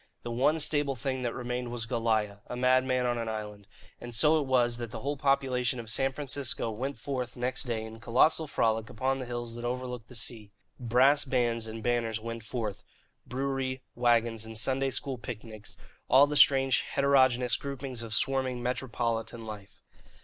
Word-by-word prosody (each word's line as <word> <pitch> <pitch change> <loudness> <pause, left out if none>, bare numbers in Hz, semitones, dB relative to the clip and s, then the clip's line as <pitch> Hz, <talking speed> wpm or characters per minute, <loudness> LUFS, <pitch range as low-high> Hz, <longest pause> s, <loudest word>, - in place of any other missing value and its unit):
The 120 - -4
one 135 +7 +2
stable 145 -3 +2
thing 130 +1 -2
that 120 -2 -2
remained 125 0 -3
was 120 -1 -3
Goliah, 110 -3 0
a - - -5
madman 130 0 +2
on 120 -1 0
an 115 -1 -3
island. 105 -2 -6 0.3
And 120 -1 -7
so 150 +8 +5
it 140 - -4
was 120 -2 +2
that 120 -1 -5
the - - -7
whole 145 +2 -1
population 130 -3 +1
of 115 -2 -5
San 135 +4 +1
Francisco 135 -4 -2
went 130 +6 -4
forth 125 -3 -4
next 125 +3 -2
day 115 -3 -2
in 110 0 -10
colossal 140 +8 +3
frolic 110 -4 0
upon 135 +4 -1
the 130 - -5
hills 120 -1 -4
that 120 0 -7
overlooked 125 -1 -4
the 125 - -13
sea. 115 -2 -4 0.3
Brass 130 +4 +4
bands 120 -3 0
and 110 0 -7
banners 115 -2 0
went 115 0 -6
forth, 110 -3 -4 0.4
brewery 130 0 -2
wagons 115 -2 +2
and 110 0 -5
Sunday 135 +4 +1
school 130 -1 -3
picnics 110 -2 -8 0.3
all 135 +3 +8
the 150 +1 -3
strange 135 -2 +5
heterogeneous 130 -3 +3
groupings 135 -3 -5
of 115 -1 -4
swarming 130 -2 +1
metropolitan 120 -2 -2
life. 105 -2 -10
125 Hz, 175 wpm, -29 LUFS, 115-130 Hz, 0.4 s, all